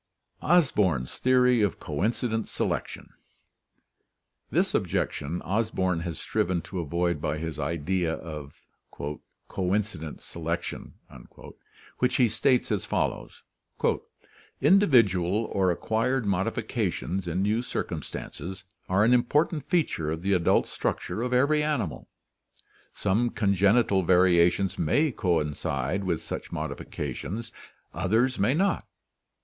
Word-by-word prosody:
Osborn's 105 - +2
Theory 125 -2 +4
of 105 - 0
Coincident 110 +1 -1
Selection.— - - -3 1.4
This - - +1
objection 80 +5 -1
Osborn 95 -4 0
has 85 -3 -4
striven 85 -1 -1
to 95 - -5
avoid 85 0 -1
by 75 +1 -1
his 80 -1 -5
idea 85 +1 -1
of 75 -4 -9 0.8
"coincident 95 -4 -2
selection," 85 +1 -5 1.0
which 125 0 +2
he 125 -3 +4
states 120 +3 +1
as 105 -4 0
follows: - - -2 1.2
"Individual 115 - +4
or 95 -2 +2
acquired 115 +7 0
modifications 95 -1 -1
in 90 +3 0
new 110 +3 +1
circumstances 95 - -5 0.3
are 95 +3 +3
an 115 +3 +5
important 145 +4 +1
feature 155 - +1
of 80 +2 -3
the 100 +1 +2
adult 90 -3 +3
struc - - -2
ture 110 - -4
of 125 +1 -2
every 140 +4 +3
animal. 130 - -2 0.8
Some 115 +6 +1
congenital 100 0 +3
variations 90 +1 +3
may 145 - +2
coincide 80 - -1
with 85 -4 -1
such - - -6
modifications, 100 - -5 0.4
others 120 +6 +1
may 115 +8 +3
not. 195 +4 +1
95 Hz, 110 wpm, -27 LUFS, 85-120 Hz, 1.4 s, an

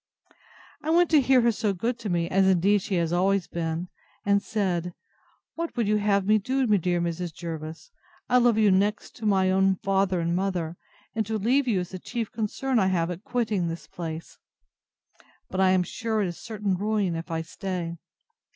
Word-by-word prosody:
I 310 - -4
went 340 +1 +4
to 305 -3 +6
hear 260 -1 +4
her 235 0 +4
so 210 -2 -1
good 230 +6 -2
to 215 -3 -4
me, 170 -1 0
as 190 +2 +3
indeed 190 +2 +3
she 190 - -2
has 170 -1 0
always 190 +1 +2
been, 165 +1 -3 0.4
and 200 0 +3
said, 180 -5 -2 0.6
What 335 -4 -5
would 230 -3 +1
you 210 0 +3
have 200 -2 +2
me 215 +1 +4
to 260 +6 0
do, 210 -3 +4
dear 175 0 0
Mrs. 170 0 -2
Jervis? 160 - -7 0.4
I 250 0 +4
love 240 -2 +4
you 215 -2 +5
next 205 +3 0
to 220 -3 -3
my 190 -2 +3
own 190 0 +3
father 195 -1 +1
and 170 0 0
mother, 180 -3 -1 0.4
and 220 - 0
to 220 0 -1
leave 255 +6 +2
you 200 -6 +2
is 180 - -6
the 185 - -7
chief 230 +2 -4
concern 235 +3 -1
I 190 - +3
have 175 -2 +1
at 180 +3 -7
quitting 220 -8 -1
this 165 0 -5
place; 165 -1 -7 1.1
but 190 - 0
I 190 - +5
am 185 -1 +3
sure 220 +3 -2
it - - 0
is 170 - -8
certain 210 -3 -2
ruin 200 -2 0
if 165 +2 -6
I 165 -1 -2
stay. 170 -1 -5
195 Hz, 200 wpm, -26 LUFS, 175-220 Hz, 1.1 s, to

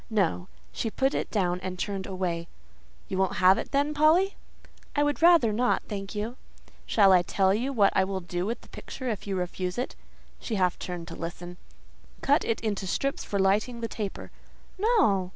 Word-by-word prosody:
No. 190 -4 0 0.2
She 225 - -2
put 270 +5 0
it - - -2
down 180 -4 0
and 185 -1 -5
turned 195 0 -3
away. 180 -3 -3 0.6
"You 190 - -3
won't 190 - +1
have 185 +1 +5
it, - - -5
then, 285 +2 +1
Polly?" 320 +7 +4 0.6
"I 290 - +3
would 290 +1 0
rather 330 -10 +6
not, 245 +3 +1
thank 195 -1 -5
you." 220 +4 -3 0.5
"Shall 195 -3 +5
I 180 - +6
tell 190 +2 +2
you 245 +6 -1
what 210 -7 +3
I 190 - +4
will 190 0 -2
do 175 +2 -3
with 230 - -3
the - - -17
picture 260 -2 -6
if 215 -2 -4
you 195 - -1
refuse 180 +1 -3
it?" 250 - -3 0.4
She 225 - -3
half 180 -2 +1
turned 175 -2 -5
to - - -7
listen. 175 +1 -7 0.6
"Cut 285 +4 +3
it 230 - -1
into 205 -3 -2
strips 275 +8 -1
for 200 - -3
lighting 210 +5 +1
the 230 - -1
taper." 210 -3 -6 0.5
"No!" 375 - +3
200 Hz, 190 wpm, -27 LUFS, 185-250 Hz, 0.6 s, rather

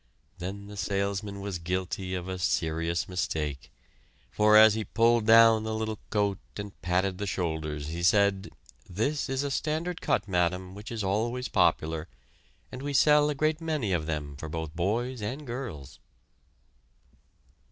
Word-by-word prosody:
Then 100 +3 -5
the 105 0 -10
salesman 100 0 -2
was 100 -3 -4
guilty 90 +2 -3
of 90 0 -5
a 95 -1 -4
serious 85 0 0
mistake, 75 -8 -3 0.6
for 105 0 +5
as 110 0 +8
he 110 0 -2
pulled 115 0 +2
down 115 -1 +7
the 110 0 -3
little 110 -1 -3
coat 100 -2 0 0.2
and 100 -1 -6
patted 90 +1 0
the 100 - -3
shoulders 80 -5 -3
he 85 +2 -4
said: 100 +1 +3 0.4
"This 130 - -1
is 135 +1 -1
a 140 - -2
standard 160 +5 -2
cut, - - 0
madam, 90 0 0
which 105 +3 -9
is 110 -3 -3
always 120 +6 -1
popular, 80 0 +1 0.6
and 125 - -7
we 145 +1 -3
sell 150 +2 +5
a 150 - -1
great 155 +3 0
many 150 -11 -1
of 80 -3 -1
them 75 -3 -3
for 80 - -7
both 80 0 -5
boys 115 +8 -1
and 130 +8 -4
girls." 120 - -7
100 Hz, 155 wpm, -28 LUFS, 90-115 Hz, 0.6 s, as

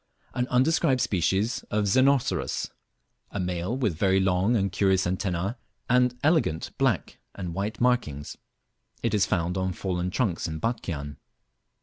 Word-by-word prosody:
An 125 0 -1
undescribed 130 0 +3
species 105 0 +1
of 105 0 +1
Xenocerus; 130 +6 +2 0.6
a 105 - -5
male, 90 +5 -2
with 105 -11 0
very 95 -1 +3
long 95 +4 +2
and 100 -3 +1
curious 95 0 +2
antenna, 95 +4 -2 0.3
and 125 0 +3
elegant 155 - +1
black - - 0 0.2
and 90 -4 -5
white 100 +5 -3
markings. 120 - 0 0.7
It - - 0
is 100 -2 +3
found 90 +2 0
on 95 0 -1
fallen 90 -1 -2
trunks 90 -4 -1
in 80 -1 -4
Batchian. 80 - -3
95 Hz, 135 wpm, -26 LUFS, 90-125 Hz, 0.7 s, undescribed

